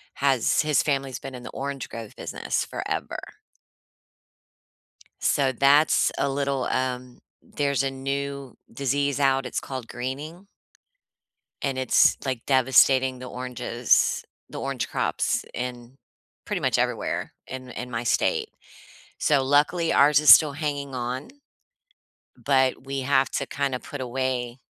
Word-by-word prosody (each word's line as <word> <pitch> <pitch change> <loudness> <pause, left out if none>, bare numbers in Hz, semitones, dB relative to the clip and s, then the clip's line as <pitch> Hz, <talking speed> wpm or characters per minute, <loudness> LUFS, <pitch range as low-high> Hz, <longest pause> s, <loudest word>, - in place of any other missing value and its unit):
has 135 -5 +2
his 150 -2 +2
family's 135 -3 -1
been 135 - -8
in 125 - -9
the - - -7
orange 140 -1 -5
grove 115 -2 -8
business - - -3
forever. - - -4 2.0
So, 135 -2 +2
that's 140 +4 +4
a 140 - +1
little, 140 -1 -1
um 125 -1 -3 0.2
there's 140 -2 -1
a 135 - 0
new 140 0 -4
disease 140 +3 0
out. 135 -2 +2
It's 125 - -3
called 130 -3 -6
greening 145 +10 -6 1.1
and 135 -2 -2
it's, 130 -1 +4
like, 130 -3 -3
devastating 130 0 +4
the 130 - -8
oranges, 125 -1 0 0.3
the - - -7
orange - - -3
crops, - - 0
in 125 +1 -6 0.5
pretty - - -2
much - - +1
everywhere - - -2
in 130 0 -7
in 125 0 -7
my 115 0 -2
state. 120 - +1 0.7
So, 145 -3 +3
luckily, 145 +5 +2
ours 145 +1 +5
is 150 - +9
still 155 -3 +3
hanging 145 -2 -3
on, 125 +2 -4 1.1
but 130 -2 +1
we 135 0 -3
have 135 0 +2
to - - -2
kinda 140 -2 -2
put 145 - -8
away 125 -1 -2
135 Hz, 130 wpm, -25 LUFS, 125-140 Hz, 2.0 s, is